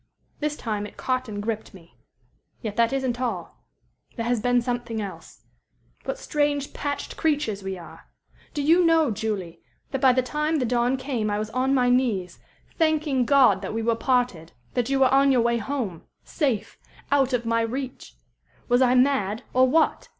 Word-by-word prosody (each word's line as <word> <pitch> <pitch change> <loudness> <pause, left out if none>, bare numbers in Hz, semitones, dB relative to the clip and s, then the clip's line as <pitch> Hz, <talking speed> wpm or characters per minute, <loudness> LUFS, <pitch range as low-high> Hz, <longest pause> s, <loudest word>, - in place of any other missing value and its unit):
This 300 0 -1
time 210 -3 -3
it - - -16
caught 255 -2 -1
and 205 -1 -5
gripped 220 -2 -4
me. 170 -2 -17 0.6
Yet 215 -3 -5
that 230 0 +3
isn't 260 -2 -1
all. 215 -9 -4 0.5
There 230 - -3
has 240 -2 0
been 245 +1 +3
something 240 -1 -3
else. 200 -3 -8 0.6
"What - - -3
strange, 290 - -1
patched 285 0 -4
creatures 290 -10 0
we 190 -1 -4
are! 170 - -13 0.5
Do 290 - -1
you 335 +5 +5
know, 325 -5 +4
Julie, 200 -5 -4 0.3
that 270 -2 -2
by 265 - +6
the 255 0 +2
time 300 +5 -1
the 270 -5 +1
dawn 245 +2 +1
came 255 -5 -2
I 205 - 0
was 215 +1 -4
on 260 +3 +1
my 250 -1 +3
knees 215 -9 0 0.4
thanking 305 -5 +2
God 250 -8 +5
that 200 +2 -5
we 225 - -1
were 230 +1 +2
parted 240 -10 0 0.2
that 245 0 0
you 275 -1 +1
were 260 0 +5
on 275 0 +5
your 250 -3 +4
way 235 0 +1
home 225 - -4 0.2
safe 265 - -2 0.3
out 275 -2 +3
of 240 -2 0
my 230 0 +1
reach? 255 +3 -5 0.5
Was 245 +1 +3
I 255 -1 +4
mad, 250 -4 +2
or 255 +1 +5
what? 320 +3 +1
245 Hz, 180 wpm, -25 LUFS, 220-275 Hz, 0.6 s, by